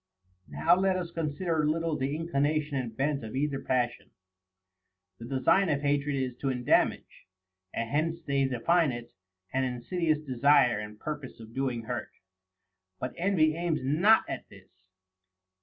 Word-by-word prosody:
8. -, -, -19 dB
Now 170 Hz, +2 st, +4 dB
let 190 Hz, 0 st, +2 dB
us 175 Hz, -2 st, -4 dB
consider 165 Hz, 0 st, -1 dB
a 150 Hz, -, +1 dB
little 165 Hz, 0 st, 0 dB
the 135 Hz, +1 st, -1 dB
inclination 155 Hz, -2 st, 0 dB
and 120 Hz, -4 st, -3 dB
bent 140 Hz, -1 st, 0 dB
of 110 Hz, +2 st, -7 dB
either 140 Hz, 0 st, -1 dB
passion. 120 Hz, -1 st, -1 dB, 1.1 s
The 115 Hz, -, -8 dB
design 135 Hz, +9 st, +2 dB
of 145 Hz, -2 st, +1 dB
hatred 145 Hz, 0 st, +1 dB
is 130 Hz, -2 st, -2 dB
to 135 Hz, -, -3 dB
endamage; 125 Hz, -6 st, 0 dB, 0.4 s
and 115 Hz, -, -3 dB
hence 160 Hz, +6 st, 0 dB
they 140 Hz, -1 st, +1 dB
define 140 Hz, +5 st, +2 dB
it, 120 Hz, -1 st, -7 dB, 0.4 s
an 130 Hz, 0 st, +1 dB
insidious 155 Hz, +6 st, 0 dB
desire 140 Hz, -4 st, +3 dB
and 105 Hz, 0 st, -8 dB
purpose 150 Hz, -5 st, -6 dB
of 110 Hz, 0 st, -12 dB
doing 130 Hz, -3 st, -2 dB
hurt. 120 Hz, +1 st, -4 dB, 0.9 s
But 125 Hz, -, -4 dB
envy 170 Hz, -4 st, +2 dB
aims 170 Hz, -3 st, -1 dB
not 175 Hz, +12 st, +4 dB
at -, -, -6 dB
this. 95 Hz, -1 st, -17 dB
140 Hz, 155 wpm, -29 LUFS, 125-160 Hz, 1.1 s, Now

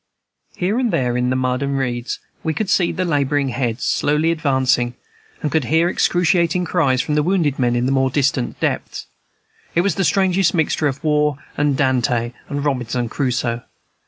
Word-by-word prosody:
Here 195 Hz, +7 st, 0 dB
and 250 Hz, -2 st, +1 dB
there 125 Hz, -2 st, 0 dB
in 125 Hz, 0 st, +1 dB
the 130 Hz, -, +1 dB
mud 130 Hz, 0 st, 0 dB
and 140 Hz, 0 st, -1 dB
reeds 120 Hz, -2 st, -2 dB, 0.3 s
we 160 Hz, -2 st, -1 dB
could 215 Hz, -3 st, -1 dB
see 175 Hz, -3 st, +3 dB
the 185 Hz, -, -2 dB
laboring 145 Hz, -3 st, +1 dB
heads, 120 Hz, -1 st, -2 dB
slowly 150 Hz, +3 st, +1 dB
advancing, 130 Hz, -6 st, +1 dB, 0.5 s
and 150 Hz, -, -1 dB
could 160 Hz, -, +1 dB
hear 165 Hz, +2 st, +2 dB
excruciating 175 Hz, -1 st, +2 dB
cries 135 Hz, -9 st, +1 dB
from 150 Hz, -, -2 dB
wounded 165 Hz, -6 st, +1 dB
men 120 Hz, -1 st, +2 dB
in 120 Hz, +1 st, +1 dB
the 130 Hz, -, +1 dB
more 135 Hz, -1 st, +2 dB
distant 135 Hz, -2 st, 0 dB
depths. -, -, -2 dB, 0.7 s
It 170 Hz, -, +4 dB
was 200 Hz, +2 st, +1 dB
the 195 Hz, -, -1 dB
strangest 185 Hz, +2 st, +2 dB
mixture 160 Hz, -1 st, +1 dB
of 140 Hz, -1 st, -4 dB
war 150 Hz, -2 st, +2 dB, 0.2 s
and 145 Hz, -2 st, +1 dB
Dante 125 Hz, -3 st, +1 dB, 0.2 s
and 145 Hz, 0 st, -3 dB
Robinson 125 Hz, -3 st, -1 dB
Crusoe. 120 Hz, -2 st, -1 dB
140 Hz, 175 wpm, -20 LUFS, 125-165 Hz, 0.7 s, It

